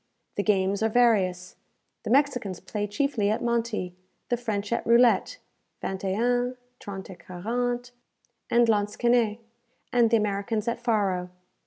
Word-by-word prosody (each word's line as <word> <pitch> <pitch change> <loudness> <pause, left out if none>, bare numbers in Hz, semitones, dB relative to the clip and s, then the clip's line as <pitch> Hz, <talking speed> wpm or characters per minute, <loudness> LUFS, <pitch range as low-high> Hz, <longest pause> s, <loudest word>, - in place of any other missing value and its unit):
The - - -1
games 195 -1 +1
are 220 - +2
various. 195 -6 +2 0.5
The - - -3
Mexicans 250 -8 +1
play 205 +2 -4
chiefly 210 -1 0
at 215 - -1
monti; 230 -6 -1 0.4
the 245 - +2
French 215 -3 -3
at - - -1
roulette, 240 - +4 0.5
vingt 190 0 -4
et 195 +1 -1
un, 245 +1 +1 0.2
trente 195 -1 -7
et 180 - -13
quarante, 245 +6 -3 0.6
and 235 0 +4
lansquenet; 220 +1 +2 0.6
and 240 -2 +4
the 230 - +4
Americans 210 +1 -1
at 235 0 -1
faro. 200 -6 0
220 Hz, 140 wpm, -26 LUFS, 200-240 Hz, 0.6 s, roulette